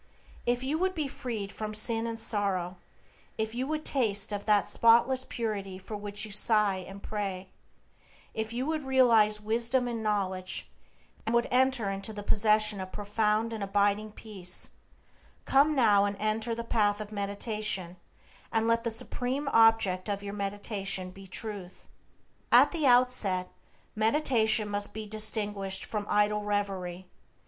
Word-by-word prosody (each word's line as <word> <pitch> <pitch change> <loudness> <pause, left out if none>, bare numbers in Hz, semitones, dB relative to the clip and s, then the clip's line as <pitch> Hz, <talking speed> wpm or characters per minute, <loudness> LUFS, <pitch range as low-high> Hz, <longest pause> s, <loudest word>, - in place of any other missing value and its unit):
If 245 +1 +1
you 295 +4 -1
would 375 +1 0
be 305 -3 -2
freed 230 -7 -5
from 215 0 -6
sin 225 +1 +3
and 230 0 -5
sorrow; 195 -5 0 0.6
if 220 0 -2
you 255 +3 -3
would 310 0 -3
taste 215 -7 +2
of 205 0 -4
that 210 -1 +3
spotless 240 +3 +4
purity 200 -5 -4
for 190 +3 -8
which 205 0 -4
you 215 - -9
sigh 210 -1 +4
and 195 +2 -10
pray; 195 -3 -4 0.8
if 220 0 -3
you 245 +3 -2
would 310 0 -2
realize 230 -5 +4
wisdom 235 +4 +2
and 235 -2 -3
knowledge, 190 -3 -2 0.5
and 225 +2 -1
would 235 - +2
enter 255 -5 +2
into 195 +3 -3
the 205 -1 -7
possession 215 -1 +3
of 185 0 -7
profound 210 +2 0
and 215 -2 -4
abiding 205 +2 +1
peace, 190 -6 -4 0.7
come 290 +3 +4
now 210 -6 +4
and 200 0 -3
enter 220 +2 -1
the 235 - -4
path 210 -3 +1
of 210 0 -7
meditation, 200 -2 -2 0.6
and 225 0 +1
let 230 0 +2
the 235 - -1
supreme 250 +5 -2
object 225 -5 +3
of 200 0 -3
your 200 0 -5
meditation 195 -2 -3
be 195 +1 -13
Truth. 190 -1 -7 0.6
At - - +7
the 315 -5 0
outset, 245 -7 +2 0.4
meditation 220 -2 +2
must 205 0 +1
be 220 0 -5
distinguished 210 -2 -2
from 210 -1 -4
idle 210 0 +2
reverie. 195 -3 -3
215 Hz, 150 wpm, -29 LUFS, 200-230 Hz, 0.8 s, At